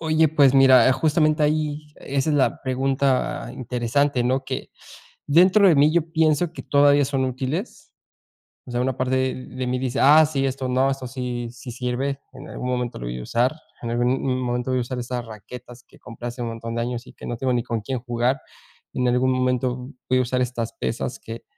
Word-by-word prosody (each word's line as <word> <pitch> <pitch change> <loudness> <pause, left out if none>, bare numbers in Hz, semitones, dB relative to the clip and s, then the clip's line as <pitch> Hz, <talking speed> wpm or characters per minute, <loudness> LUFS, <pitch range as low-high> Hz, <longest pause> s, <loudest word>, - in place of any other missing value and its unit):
Oye, 160 -1 +3
pues 140 -4 +4
mira, 130 -3 +7
eh, - - +5
justamente 155 +2 +2
ahí, 150 0 0
esa 140 +2 -2
es 150 - +2
la 135 - +1
pregunta 135 0 0
interesante, 125 +2 0
¿no?, 130 +2 0
que - - -5 0.6
dentro 185 +6 +5
de 165 - +4
mí, 145 +2 +5
yo 165 -1 0
pienso 160 +1 +2
que - - -8
todavía 145 0 +4
son 135 -1 -1
útiles. 130 - -4 0.7
O 125 - -10
sea, 120 0 0
una 130 0 -1
parte 130 0 0
de 130 0 -6
mí 125 0 -1
dice: 130 -1 -2
"Ah, 150 +3 +7
sí, 140 -3 -1
esto 130 0 -2
no, 130 +2 +2
esto 135 -2 -5
sí 125 -2 -4
sí 120 0 -9
sirve, 125 +3 -2
en - - -11
algún 125 - -5
momento 125 -1 -2
lo - - -6
voy 60 +1 -4
a - - -6
usar, 120 - +1 0.3
en 120 - -4
algún 120 +1 +1
m 130 0 0
momento 125 0 -2
voy 130 - +1
a - - 0
usar 125 +1 -4
esas 120 0 -4
raquetas 120 +3 -11
que - - -20
compré 120 0 -8
hace 120 +1 -8
un 120 - -2
montón 115 0 -6
de 115 - -1
años 120 +1 -4
y - - -13
que - - -11
no 120 - -4
tengo 130 +1 0
ni 120 -1 0
con 115 -2 -2
quién 130 +4 -3
jugar. 120 +2 0 0.6
En 125 0 0
algún 125 +1 +2
momento 125 0 -1 0.2
voy 130 - +3
a - - +4
usar 125 +1 -1
estas 120 -2 -2
pesas 65 - -4
que 115 +1 -9
130 Hz, 215 wpm, -23 LUFS, 125-140 Hz, 0.7 s, mira